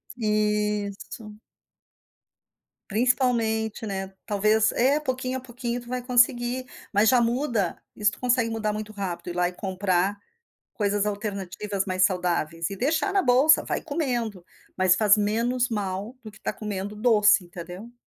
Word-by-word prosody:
Isso. 210 -1 -2 1.5
Principalmente, 225 -2 +1
né, 195 -1 -4
talvez 215 +2 +2
é, 265 +4 +3
pouquinho 260 -2 -2
a - - -7
pouquinho 245 -1 -4
tu 240 - -14
vai 250 0 -2
conseguir, 245 0 +2 0.3
mas 210 +2 +5
já 250 - +5
muda, 235 - 0 0.2
isso 210 -1 +1
tu - - -11
consegue 245 -2 +2
mudar 220 -1 -1
muito 215 0 -6
rápido. 190 -4 -5
Ir 175 - -5
lá 180 0 +2
e - - -9
comprar 190 +1 0 0.6
coisas 205 -1 0
alternativas 200 -1 -3
mais 185 -1 0
saudáveis, 170 -2 0
e 195 - -5
deixar 315 - +1
na 390 - +3
bolsa, 260 +5 +5
vai - - -2
comendo, 240 - -2 0.3
mas 185 -1 +4
faz 215 -1 +5
menos 235 +4 +1
mal 205 +1 -3
do 215 - -9
que 215 - -18
tá - - -2
comendo 205 -1 -5
doce 210 -4 +4
entendeu. 180 +7 -10
215 Hz, 145 wpm, -25 LUFS, 195-245 Hz, 1.5 s, mas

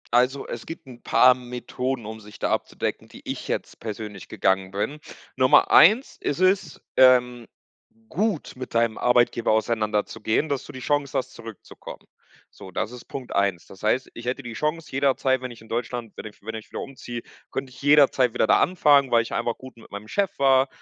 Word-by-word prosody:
Also, 125 +3 +2
es 120 - -7
gibt 145 -7 -10
paar 130 0 +6
'n 125 -1 -12
Methoden, 125 0 -4
um 110 +1 -7
sich 105 -1 -13
da - - -1
abzudecken, - - -2
die - - -14
ich - - -5
jetzt - - -4
persönlich 105 -3 -7
gegangen 95 -2 0
bin. 105 +10 -3 0.4
Nummer 130 0 +5
1 215 - +6
ist 145 +5 -2
es, 185 -4 +1 0.2
ähm, 125 -2 +5 0.6
gut 200 -3 -1
mit 130 -1 -7
deinem 115 -1 +2
Arbeitgeber 120 -2 +2
auseinanderzugehen, 110 +3 0
dass 140 -1 -2
du - - -11
die 130 - -8
Chance 145 0 0
hast, 130 0 -3
zurückzukommen. 115 -2 -11 0.4
So, 95 - -12
das 105 - -3
ist 125 -1 -11
Punkt 130 -3 -7
1. 100 -3 0
Das 95 - -15
heißt, 120 +4 +1
ich 120 - -10
hätte 130 +2 -3
die 120 - -7
Chance 150 +4 -3
jederzeit, 135 -1 +1
wenn 130 -1 -5
ich 115 - -13
in 110 - -16
Deutschland 120 -1 -3
wenn - - -7
ich 110 - -11
wenn 110 +2 -6
ich 110 - -9
wieder - - -5
umziehe, 125 -3 -7 0.3
könnte 135 -1 -5
ich 130 - -14
jederzeit 140 -4 +4
wieder - - +1
da - - +5
anfangen, 145 -7 +4
weil 115 - +5
ich 115 - -8
einfach 120 - -1
gut 130 -2 -13
mit 115 - -16
meinem 100 +1 -8
Chef 200 -3 -1
war. 135 -1 +4
125 Hz, 195 wpm, -24 LUFS, 110-135 Hz, 0.6 s, paar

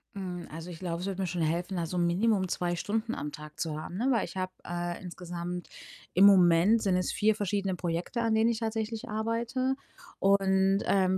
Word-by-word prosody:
Hm, 180 -3 -5
also, 165 +3 -7
ich 170 - -7
glaube, 170 -1 -3
es 180 - -4
würde 195 -1 -3
mir - - 0
schon 175 0 -2
helfen, 175 +4 -1
also, 170 +1 -2
minimum 185 +3 +2
2 175 0 -1
Stunden 220 +6 -2
am 150 +1 -4
Tag 150 -1 -11
zu 155 -2 -2
haben, 175 - -7
ne? 245 +6 +1
Weil 235 - +2
ich - - -9
habe, 185 0 -2
äh, 175 0 -4
insgesamt 175 -1 -6 0.4
im 190 +3 +7
Moment 190 +3 +6
sind 190 -2 +2
es 185 - 0
4 215 0 +3
verschiedene 200 -1 -1
Projekte, 175 +6 -2
an 225 -1 +2
denen 225 +1 +4
ich 225 - -2
tatsächlich 225 0 -3
arbeite 230 +4 -1 0.4
und, 195 0 +3
ähm, 190 -1 +3
190 Hz, 200 wpm, -29 LUFS, 175-215 Hz, 0.4 s, im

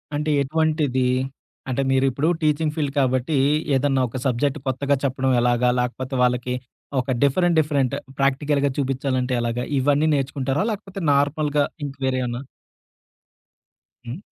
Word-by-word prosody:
అంటే 150 +1 -1
ఎటువంటిది? 145 -3 +1 0.6
అంటే 130 +1 0
మీరు 135 0 +3
ఇప్పుడు 140 +5 -1
టీచింగ్ 150 0 +1
ఫీల్డ్ 145 -4 -1
కాబట్టి, 130 +2 +1 0.4
ఏదన్నా 135 0 +2
ఒక 130 - -6
సబ్జెక్ట్ 140 +3 0
కొత్తగా 140 +2 +1
చెప్పడం 130 -1 0
ఎలాగా 120 0 +2
లేకపోతే 130 +2 -3
వాళ్ళకి 125 0 0 0.5
ఒక 130 +1 -1
డిఫరెంట్ 170 +5 +3
డిఫరెంట్ 140 -4 +1 0.2
ప్రాక్టికల్‌గా 140 +1 +1
చూపించాలంటే 130 -2 -1
ఎలాగా 120 +1 -2 0.2
ఇవన్నీ 145 +3 +2
నేర్చుకుంటారా? 135 +2 -1
లేకపోతే 195 -2 -6
నార్మల్‌గా 145 +1 +1 0.2
ఇంక 140 -1 -6
వేరే 130 -1 0
ఏమన్నా? 120 0 -3 1.6
హ్మ్. 120 +4 -5
135 Hz, 125 wpm, -22 LUFS, 130-145 Hz, 1.6 s, మీరు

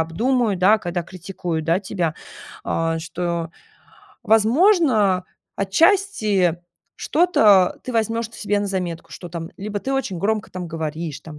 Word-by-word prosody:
обдумаю", 220 +7 0
да, 195 +5 +4
когда 175 -2 -3
критикуют, 175 -2 -5
да, 170 +2 +3
тебя. 180 -5 -2 0.5
А, 165 0 -1
что, 170 0 -3 0.7
возможно, 225 - +3 0.3
отчасти 210 - +2 0.4
что-то 215 - +3
ты 255 - -5
возьмешь 230 0 0
т 230 - -14
себе 205 -1 0
на 205 - -2
заметку, 180 -4 -4
что 175 - -9
там 170 -1 -6
либо 205 +1 -4
ты 265 +6 -4
очень 255 -10 -2
громко 215 +4 -1
там 180 -1 -6
говоришь, 160 -1 -5
там 155 -2 -11
195 Hz, 135 wpm, -21 LUFS, 170-220 Hz, 0.7 s, да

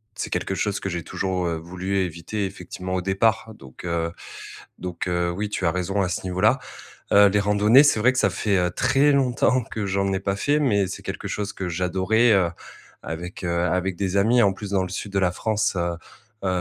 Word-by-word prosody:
c'est - - -4
quelque - - -1
chose 100 +1 -2
que 100 - -3
j'ai 85 -2 -4
toujours, 95 -2 -2
heu, 85 - -1
voulu 90 +4 -4
éviter 90 +3 -3
effectivement 90 -1 -6
au 90 - 0
départ. 110 +4 +1
Donc, 65 -2 -13
heu 85 -1 -1 0.7
donc 90 -1 -5
heu 85 -1 0
oui, 100 +4 -3
tu 100 - -3
as 85 - +3
raison 90 +3 -1
à 95 - 0
ce 90 - -3
niveau-là. 95 +8 +2 0.5
Heu, 100 0 +7
les 105 +1 +2
randonnées, 105 +6 +5
c'est 145 -7 +3
vrai 125 +4 +4
que - - -5
ça - - +3
fait, 105 -2 -1
heu, 90 -1 +1
très 135 +10 +3
longtemps 130 -2 +2
que 110 -2 -4
j'en 100 0 0
ai 95 - 0
pas 100 0 -1
fait, 145 +7 +1
mais 105 -9 +2
c'est 95 - -7
quelque - - -5
chose 105 0 -3
que 95 - -4
j'adorais, 95 +7 +2
heu, 95 -4 +3 0.5
avec, 85 +4 -6
heu, 90 - -1
avec 90 0 -1
des 95 0 -2
amis. 115 +5 +4
En 100 -1 +3
plus, 100 +1 -7
dans 95 -2 +2
le - - -3
sud 100 +2 -5
de 100 - +2
la 90 -2 +2
France 110 +1 0
heu, 85 0 -1 0.5
heu - - +1
95 Hz, 220 wpm, -23 LUFS, 90-105 Hz, 0.7 s, Heu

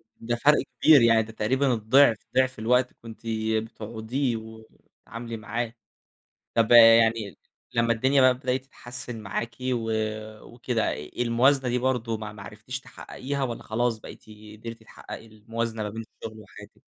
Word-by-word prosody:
ده 120 +1 -3
فرْق 150 +5 +4 0.2
كبير، 155 -4 +8
يعني 115 -1 +5
ده 110 - -10
تقريبًا 130 +5 +1
الضِّعف، 115 +1 +4 0.2
ضِعف 130 -2 +2
الوقت 125 +3 +2
كنتِ 115 -1 -12 0.4
بتقعُديه 115 +3 -3
وتتعاملي 110 +1 -10
معاه. 110 +2 -4 0.8
طَب 115 0 +3
آآ، - - +10 0.3
يعني 110 -6 -1 0.4
لمّا 115 0 +3
الدنيا 130 +4 +2
بقى 130 - +7
ابتدِت 130 +1 -2
تتحسِّن 120 -3 -8
معاكِ 115 +3 -4
و 120 -3 -1
آآ 110 0 -3
وكده، 120 -1 -2
الموازنة 120 - +1
دي 125 +1 +1
برضه 120 -3 -1
ما 110 -1 -7
ما 100 -1 -11
عرفتيش 110 +7 -7
تحقّقيها 140 +1 -6
والّا 120 -3 -3
خلاص 115 +1 -1
بقيتِ - - -12 0.4
قدرتِ 115 0 -8
تحققي 110 - -10
الموازنة 115 +1 -4
ما 105 - -3
بين 115 +2 -6 0.2
الشغل 110 -1 -7
وحياتِك؟ 100 -3 -15
115 Hz, 150 wpm, -26 LUFS, 110-125 Hz, 0.8 s, آآ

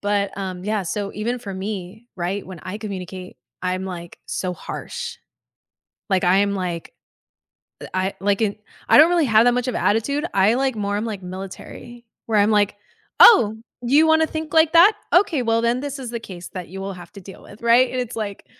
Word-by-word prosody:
but, 200 -1 -1
um, 185 -2 -5
yeah, 210 -1 -1
so 200 +3 -4
even 235 +4 -2
for 205 -5 -7
me, 195 +3 -6
right, 185 +3 -3
when 185 -3 -10
I 200 +3 -6
communicate, 185 -3 -7 0.2
I'm, 185 +1 -2
like, 175 -2 -8
so 185 -1 -3
harsh, 475 - -7 0.9
like, 190 0 +2
I 180 +2 +4
am 200 0 +1
like, 175 -3 -4 0.9
eh, - - -7
I 185 +1 -1
like 200 +2 +1
it 210 0 -2 0.3
I - - +7
don't 310 - +8
really 345 -2 +2
have 220 0 +5
that 245 - +4
much 250 +1 -1
of 250 - -2
attitude, 280 +11 0
I 200 +4 +4
like 265 -2 0
more 205 -1 -2
I'm 210 - -2
like 205 -4 -5
military, 195 +6 -9 0.2
where 220 -2 +1
I'm 205 +1 +4
like, 205 -1 +2 0.5
"Oh, 220 - +8 0.3
you 285 +6 +4
wanna 320 0 +4
think 315 -1 -6
like 320 -1 +4
that? 355 +6 +8 0.2
okay, 355 -6 +4
well, 230 0 +1
then 235 +2 +1
this 285 0 -5
is 250 -3 -6
the 235 -1 -4
case 180 -4 -9
that 185 -3 -7
you 195 +2 -8
will 195 0 -4
have 175 -2 -12
to 200 - -11
deal 190 +1 -12
with," 210 - -15
right? 240 +2 +4
And 255 - -2
it's 245 -2 -5
like, 205 -3 -5
210 Hz, 205 wpm, -22 LUFS, 190-245 Hz, 0.9 s, don't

